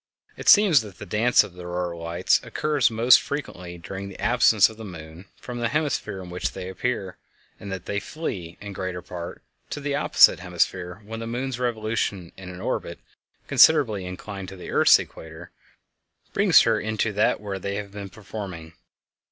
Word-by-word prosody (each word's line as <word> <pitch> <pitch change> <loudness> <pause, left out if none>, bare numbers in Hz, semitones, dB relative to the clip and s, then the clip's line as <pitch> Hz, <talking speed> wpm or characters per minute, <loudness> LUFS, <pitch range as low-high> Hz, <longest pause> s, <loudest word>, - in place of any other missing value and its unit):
It - - -1
seems 200 - +7
that 105 -4 -11
the - - -8
dance 115 +6 +3
of 105 -4 -10
the 90 - -11
auroral 90 -1 -4
lights 85 +2 +1
occurs 150 -4 +1
most 120 +2 +5
frequently 90 -12 -6
during 95 +3 -7
the 95 - -12
absence 115 -3 +5
of 110 - -12
the 110 - -9
moon 85 -2 -10
from 120 -1 -7
the 120 - +1
hemisphere 145 -9 -2
in 90 - -10
which 90 - -3
they 95 -1 -6
appear, 95 -1 -3 0.4
and 100 - -8
that 95 -2 -6
they 100 - -2
flee, 95 - -6
in 100 -1 -8
greater 95 -2 -5
part, 85 -1 -8 0.3
to - - -4
the 145 0 -3
opposite 140 - +5
hemisphere 90 +2 -2
when 115 +2 -6
the 115 - -5
moon's 125 +1 -3
revolution 110 -6 -2
in 95 -1 -10
an 90 0 -9
orbit - - -3 0.5
considerably 115 -12 +5
inclined 95 +1 -7
to 95 - -10
the 90 - -9
earth's - - +6
equator 80 0 -10 0.8
brings - - +6
her - - +2
into 110 0 -1
that 105 - +2
where 100 -2 -5
they 100 +1 -4
have 100 -1 -5
been 100 -1 -7
performing. 95 -6 -8
100 Hz, 180 wpm, -24 LUFS, 90-115 Hz, 0.8 s, seems